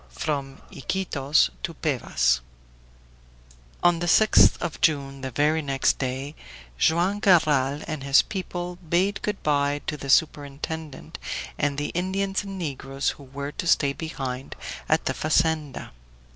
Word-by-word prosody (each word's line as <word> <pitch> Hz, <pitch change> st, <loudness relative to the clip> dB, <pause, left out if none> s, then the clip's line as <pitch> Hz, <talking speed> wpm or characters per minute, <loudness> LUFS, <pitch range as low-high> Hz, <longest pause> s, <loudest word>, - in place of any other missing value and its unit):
FROM 140 Hz, -3 st, -3 dB
IQUITOS 145 Hz, -, +1 dB
TO -, -, -4 dB
PEVAS -, -, +1 dB, 1.4 s
On 175 Hz, -1 st, +4 dB
the 175 Hz, -, -2 dB
6th 215 Hz, +5 st, +6 dB
of 160 Hz, -, -4 dB
June, 140 Hz, -3 st, +1 dB
the 130 Hz, -, -3 dB
very 150 Hz, +5 st, +1 dB
next 135 Hz, -2 st, +1 dB
day, 135 Hz, +2 st, -3 dB, 0.5 s
Joam 175 Hz, +5 st, +2 dB
Garral 150 Hz, -8 st, +3 dB
and 155 Hz, -3 st, -4 dB
his 140 Hz, 0 st, +5 dB
people 180 Hz, -2 st, -5 dB
bade 180 Hz, +4 st, 0 dB
good 210 Hz, -1 st, -3 dB
by 145 Hz, -1 st, +1 dB
to 150 Hz, -, -3 dB
the 140 Hz, -1 st, -7 dB
superintendent 150 Hz, 0 st, -1 dB, 0.4 s
and 145 Hz, -1 st, 0 dB
the 145 Hz, -, -2 dB
Indians 195 Hz, +2 st, -1 dB
and 195 Hz, -1 st, -7 dB
negroes 135 Hz, -4 st, -2 dB
who 140 Hz, -, -13 dB
were 140 Hz, +2 st, -6 dB
to 170 Hz, -, -5 dB
stay 140 Hz, -4 st, +3 dB
behind 135 Hz, -5 st, -5 dB, 0.3 s
at -, -, +2 dB
the -, -, 0 dB
fazenda. 155 Hz, -2 st, 0 dB
150 Hz, 135 wpm, -25 LUFS, 135-175 Hz, 1.4 s, 6th